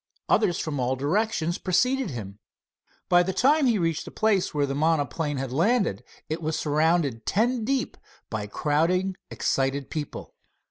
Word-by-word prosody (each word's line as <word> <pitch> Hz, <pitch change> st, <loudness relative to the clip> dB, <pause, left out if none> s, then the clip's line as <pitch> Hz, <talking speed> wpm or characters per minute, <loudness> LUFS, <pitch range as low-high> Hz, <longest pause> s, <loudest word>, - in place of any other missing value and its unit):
Others 200 Hz, -6 st, +3 dB
from 150 Hz, -4 st, -3 dB
all 125 Hz, +1 st, 0 dB
directions 170 Hz, -, 0 dB
preceded 250 Hz, +8 st, +1 dB
him. 105 Hz, -5 st, -7 dB, 0.7 s
By 175 Hz, 0 st, +5 dB
the 185 Hz, +2 st, -1 dB
time 280 Hz, +7 st, +4 dB
he 235 Hz, -3 st, +3 dB
reached 165 Hz, -3 st, -1 dB
the -, -, -7 dB
place 210 Hz, -4 st, +1 dB
where 145 Hz, -1 st, +1 dB
the 135 Hz, -, -3 dB
monoplane 150 Hz, 0 st, 0 dB
had 130 Hz, -1 st, -4 dB
landed, 170 Hz, -, +1 dB, 0.2 s
it 160 Hz, +2 st, -3 dB
was 155 Hz, 0 st, -1 dB
surrounded 150 Hz, -5 st, +1 dB
ten 235 Hz, +3 st, +1 dB
deep 265 Hz, +3 st, -1 dB, 0.3 s
by 105 Hz, -2 st, -4 dB
crowding 170 Hz, -, 0 dB
excited 135 Hz, 0 st, -1 dB
people. 150 Hz, -3 st, -5 dB
160 Hz, 150 wpm, -26 LUFS, 140-200 Hz, 0.7 s, By